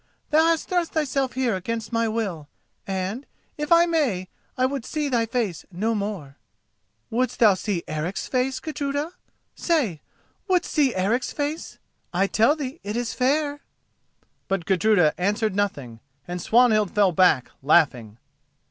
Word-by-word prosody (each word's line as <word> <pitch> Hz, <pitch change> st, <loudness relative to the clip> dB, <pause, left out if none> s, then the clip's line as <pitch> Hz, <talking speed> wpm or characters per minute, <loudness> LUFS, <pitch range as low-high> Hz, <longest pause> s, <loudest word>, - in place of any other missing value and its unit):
Thou 310 Hz, +1 st, +5 dB
hast 330 Hz, -1 st, +1 dB
thrust 350 Hz, -2 st, -1 dB
thyself 275 Hz, -4 st, 0 dB
here 250 Hz, -5 st, 0 dB
against 225 Hz, +5 st, -4 dB
my 230 Hz, 0 st, +2 dB
will 195 Hz, -10 st, -3 dB, 0.4 s
and, 195 Hz, +6 st, -3 dB, 0.3 s
if 300 Hz, +1 st, -5 dB
I 335 Hz, 0 st, +7 dB
may, 265 Hz, -, 0 dB, 0.3 s
I 255 Hz, -, +3 dB
would 270 Hz, -1 st, -2 dB
see 300 Hz, +2 st, -2 dB
thy 235 Hz, -3 st, +1 dB
face 225 Hz, -7 st, -2 dB
no 215 Hz, +6 st, -1 dB
more." 200 Hz, -10 st, -4 dB, 0.7 s
"Wouldst 250 Hz, +1 st, 0 dB
thou 215 Hz, -4 st, +6 dB
see 185 Hz, -2 st, -3 dB
Eric's 155 Hz, +5 st, -3 dB
face, 260 Hz, +1 st, 0 dB
Gudruda?—say, 290 Hz, -, -3 dB, 0.5 s
wouldst 365 Hz, -2 st, +1 dB
see 280 Hz, -6 st, +2 dB
Eric's 205 Hz, +7 st, 0 dB
face? 295 Hz, +2 st, -4 dB, 0.4 s
I 190 Hz, +3 st, +2 dB
tell 225 Hz, +8 st, +3 dB
thee 285 Hz, 0 st, -6 dB
it 210 Hz, +3 st, -3 dB
is 240 Hz, -1 st, -2 dB
fair!" 290 Hz, +3 st, 0 dB, 0.9 s
But 195 Hz, -3 st, -1 dB
Gudruda 185 Hz, -4 st, +3 dB
answered 210 Hz, +2 st, 0 dB
nothing, 140 Hz, -, -2 dB, 0.3 s
and 175 Hz, 0 st, -4 dB
Swanhild 220 Hz, -4 st, +3 dB
fell 200 Hz, -3 st, +4 dB
back, 170 Hz, -7 st, +3 dB
laughing. 130 Hz, -8 st, +2 dB
225 Hz, 140 wpm, -24 LUFS, 185-280 Hz, 0.9 s, I